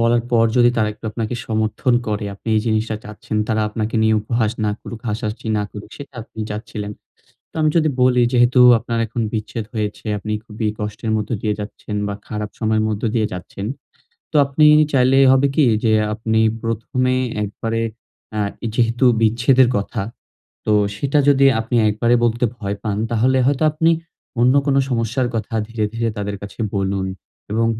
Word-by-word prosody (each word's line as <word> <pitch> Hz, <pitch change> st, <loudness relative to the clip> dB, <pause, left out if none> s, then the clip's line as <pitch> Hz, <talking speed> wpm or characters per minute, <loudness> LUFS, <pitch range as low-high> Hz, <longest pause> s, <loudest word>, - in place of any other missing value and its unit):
বলার 115 Hz, 0 st, +3 dB
পর 115 Hz, -1 st, +4 dB
যদি 120 Hz, 0 st, +6 dB
তারা 110 Hz, -2 st, +2 dB
একটু 110 Hz, -, -19 dB
আপনাকে 115 Hz, +2 st, -3 dB
সমর্থন 110 Hz, +3 st, 0 dB
করে 105 Hz, 0 st, -2 dB
আপনি 105 Hz, -, -10 dB
এই -, -, +3 dB
জিনিসটা 110 Hz, 0 st, 0 dB
চাচ্ছেন। 105 Hz, +1 st, -6 dB
তারা 110 Hz, -1 st, +1 dB
আপনাকে 110 Hz, +1 st, -3 dB
নিয়ে 110 Hz, 0 st, +4 dB
উপহাস 110 Hz, -1 st, 0 dB
না 105 Hz, -, +1 dB
করুক, 115 Hz, -, -8 dB
হাসাহাসি 110 Hz, +1 st, -4 dB
না -, -, 0 dB
করুক, 105 Hz, 0 st, -9 dB
সেটা 145 Hz, -2 st, -11 dB
আপনি 110 Hz, -, -10 dB
চাচ্ছিলেন। 105 Hz, -1 st, -5 dB, 0.6 s
তো -, -, -42 dB
আমি 155 Hz, -1 st, +3 dB
যদি 155 Hz, -2 st, +3 dB
বলি 125 Hz, -1 st, +4 dB
যেহেতু 125 Hz, +1 st, +4 dB, 0.2 s
আপনার 115 Hz, +1 st, -3 dB
এখন 115 Hz, +1 st, -3 dB
বিচ্ছেদ 110 Hz, 0 st, -3 dB
হয়েছে, 105 Hz, +1 st, -3 dB
আপনি 105 Hz, +1 st, -4 dB
খুবই 110 Hz, -1 st, -3 dB
কষ্টের 105 Hz, +1 st, -4 dB
মধ্যে 105 Hz, +2 st, -2 dB
দিয়ে 105 Hz, -1 st, 0 dB
যাচ্ছেন 105 Hz, 0 st, -6 dB
বা 100 Hz, -, -3 dB
খারাপ 105 Hz, -1 st, -4 dB
সময়ের 110 Hz, -1 st, +1 dB
মধ্য 105 Hz, -1 st, -3 dB
দিয়ে 110 Hz, -2 st, +2 dB
যাচ্ছেন। 90 Hz, +2 st, -6 dB, 0.7 s
তো -, -, -9 dB
আপনি 140 Hz, +2 st, +3 dB, 0.3 s
চাইলে 130 Hz, 0 st, +4 dB
হবে 135 Hz, +1 st, +4 dB
কি 150 Hz, -, +4 dB, 0.2 s
যে 110 Hz, -1 st, +3 dB, 0.2 s
আপনি 110 Hz, 0 st, 0 dB, 0.2 s
প্রথমে 115 Hz, +3 st, -1 dB, 0.3 s
একবারে 115 Hz, +2 st, -3 dB, 0.5 s
অ্যা 105 Hz, -1 st, -2 dB, 0.3 s
যেহেতু 120 Hz, +2 st, +2 dB, 0.2 s
বিচ্ছেদের 120 Hz, +3 st, +4 dB
কথা, 100 Hz, -, -3 dB, 0.7 s
তো 105 Hz, -, +3 dB, 0.2 s
সেটা 140 Hz, +5 st, +1 dB
যদি 140 Hz, -1 st, +5 dB
আপনি 115 Hz, +2 st, -2 dB
একবারে 115 Hz, +3 st, +2 dB
বলতে 120 Hz, +1 st, +1 dB
ভয় 100 Hz, -3 st, -4 dB
পান 105 Hz, -2 st, -2 dB
তাহলে 125 Hz, +3 st, +2 dB
হয়তো 145 Hz, +2 st, +1 dB
আপনি 165 Hz, +2 st, +2 dB, 0.5 s
অন্য 125 Hz, +3 st, +4 dB
কোনো 140 Hz, -1 st, +3 dB
সমস্যার 120 Hz, +2 st, 0 dB
কথা 115 Hz, +1 st, -3 dB
ধীরে, 115 Hz, -2 st, -2 dB
ধীরে 115 Hz, 0 st, 0 dB
তাদের 100 Hz, 0 st, -3 dB
কাছে 100 Hz, +3 st, -9 dB, 0.2 s
বলুন 95 Hz, 0 st, -1 dB, 0.5 s
এবং 115 Hz, +1 st, +2 dB
115 Hz, 170 wpm, -20 LUFS, 105-125 Hz, 0.7 s, যদি